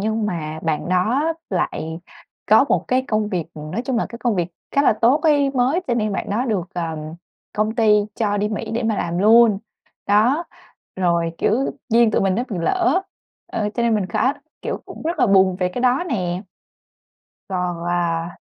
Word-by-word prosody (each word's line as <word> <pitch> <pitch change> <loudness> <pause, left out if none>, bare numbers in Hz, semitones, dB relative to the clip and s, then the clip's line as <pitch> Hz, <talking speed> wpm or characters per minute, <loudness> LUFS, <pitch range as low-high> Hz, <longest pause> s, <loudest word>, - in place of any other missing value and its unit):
nhưng 220 +1 -1
mà 160 -5 -4
bạn 160 +1 -1
đó 240 - +1 0.2
lại 165 -3 -2 0.5
có 220 +6 +6
một - - +1
cái 255 +1 +2
công 215 -1 0
việc, 180 -5 -2
ừm, 155 0 -8
nói 235 - -2
chung 255 -2 -1
là - - 0
cái 235 - -9
công 240 -4 0
việc 175 -2 -1 0.2
khá 280 - +2
là - - +5
tốt 235 +7 +3
ấy, 290 -4 +3
mới, 265 +6 +1
cho 240 - +2
nên 215 -3 0
bạn 195 - -3
đó 230 +5 0
được, 195 -7 -2
ừm, 160 -2 -4 0.4
công 215 +1 0
ty 220 -2 +4 0.2
cho 205 -3 0
đi 205 +1 0
Mỹ 220 +1 -4
để 235 - -1
mà 220 -2 0
làm 170 +1 -2
luôn. 220 0 +6 0.5
Đó, 235 +11 +3 0.5
rồi, 170 -2 +1
kiểu, 255 +6 +1 0.2
duyên 230 -1 +4
tụi - - +1
mình 195 -1 +2
nó 240 - 0
bị 195 - -4
lỡ, 365 - +1 0.5
ờ, 210 -1 -1
cho 235 - -1
nên 235 -1 +2
mình 205 -3 0
khá 255 +9 +1 0.3
kiểu, - - -3
cũng - - -10
rất 330 +1 -2
là 250 - +4
buồn 190 -2 +4
về 180 -1 0
cái 240 - -5
đó 255 +6 +2
nè. 180 -6 -2 1.1
Còn, 180 -2 -2
à, 170 -1 -1
210 Hz, 200 wpm, -21 LUFS, 180-240 Hz, 1.1 s, có